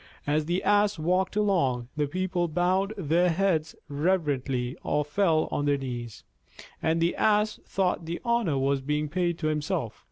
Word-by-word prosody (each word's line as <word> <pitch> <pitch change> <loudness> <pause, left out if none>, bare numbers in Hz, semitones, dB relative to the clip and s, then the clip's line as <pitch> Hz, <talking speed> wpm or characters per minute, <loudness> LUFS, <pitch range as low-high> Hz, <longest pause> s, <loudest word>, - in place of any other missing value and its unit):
As 150 +1 +1
the 175 +3 -1
Ass 205 -1 +3
walked 180 +4 0
along, 140 - +1
the 150 -1 0
people 180 +1 -1
bowed 180 +5 +1
their 175 0 +2
heads 165 -3 0
reverently 140 -5 -1
or 150 0 0
fell 160 0 +2
on 145 - -1
their 145 -1 +2
knees, 120 -4 -6 0.6
and 160 +1 +1
the 170 +1 +1
Ass 215 0 +2
thought 180 -3 0
the 170 +1 -3
honor 235 -11 +1
was 135 0 +1
being 150 +2 -1
paid 175 +1 0
to 165 - -5
himself. 150 - -2
165 Hz, 160 wpm, -27 LUFS, 145-185 Hz, 0.6 s, Ass